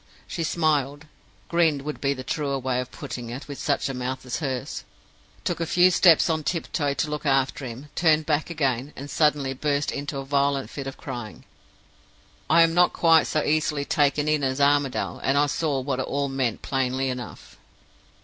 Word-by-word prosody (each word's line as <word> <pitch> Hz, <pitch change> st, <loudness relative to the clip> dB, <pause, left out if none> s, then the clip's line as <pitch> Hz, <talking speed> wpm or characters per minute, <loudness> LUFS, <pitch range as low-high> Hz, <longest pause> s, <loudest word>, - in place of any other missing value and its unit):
She 170 Hz, -, -5 dB
smiled 150 Hz, -3 st, 0 dB, 0.4 s
(grinned 160 Hz, -5 st, +2 dB
would 150 Hz, +1 st, -5 dB
be 140 Hz, 0 st, +1 dB
the 130 Hz, -, -7 dB
truer 140 Hz, -1 st, -2 dB
way 130 Hz, -1 st, -1 dB
of 125 Hz, -, -7 dB
putting 120 Hz, -2 st, -7 dB
it, 125 Hz, +4 st, -7 dB
with 140 Hz, -1 st, -7 dB
such 145 Hz, -1 st, 0 dB
a 135 Hz, -, -3 dB
mouth 130 Hz, +1 st, -4 dB
as 125 Hz, -, -3 dB
hers); 130 Hz, -6 st, -4 dB, 0.6 s
took -, -, -2 dB
a 165 Hz, -, -2 dB
few 180 Hz, +2 st, +5 dB
steps 170 Hz, -2 st, +5 dB
on 160 Hz, -2 st, 0 dB
tiptoe 145 Hz, -3 st, -1 dB
to 155 Hz, -, 0 dB
look 150 Hz, -, -3 dB
after 135 Hz, -1 st, +1 dB
him; 125 Hz, +5 st, -9 dB
turned 160 Hz, -2 st, +3 dB
back 155 Hz, +1 st, 0 dB
again, 140 Hz, -4 st, -1 dB
and 140 Hz, +2 st, -8 dB
suddenly 150 Hz, -3 st, +2 dB
burst 145 Hz, +1 st, -1 dB
into 145 Hz, 0 st, -4 dB
a 135 Hz, -, -5 dB
violent 140 Hz, 0 st, 0 dB
fit 140 Hz, -2 st, -6 dB
of 135 Hz, -, -7 dB
crying. 120 Hz, -8 st, -7 dB, 1.0 s
I 165 Hz, +1 st, +7 dB
am 165 Hz, 0 st, +2 dB
not 175 Hz, +1 st, +4 dB
quite 165 Hz, -1 st, +4 dB
so 155 Hz, -, 0 dB
easily 150 Hz, -1 st, 0 dB
taken 145 Hz, 0 st, +1 dB
in 150 Hz, -1 st, +1 dB
as 130 Hz, +1 st, 0 dB
Armadale, 140 Hz, -1 st, +1 dB
and 135 Hz, +1 st, +2 dB
I 145 Hz, -, +5 dB
saw 145 Hz, -1 st, -1 dB
what 130 Hz, -1 st, -2 dB
it -, -, -2 dB
all 140 Hz, 0 st, -1 dB
meant 130 Hz, -4 st, -2 dB
plainly 135 Hz, 0 st, -1 dB
enough. 125 Hz, -2 st, -8 dB
140 Hz, 190 wpm, -25 LUFS, 135-155 Hz, 1.0 s, I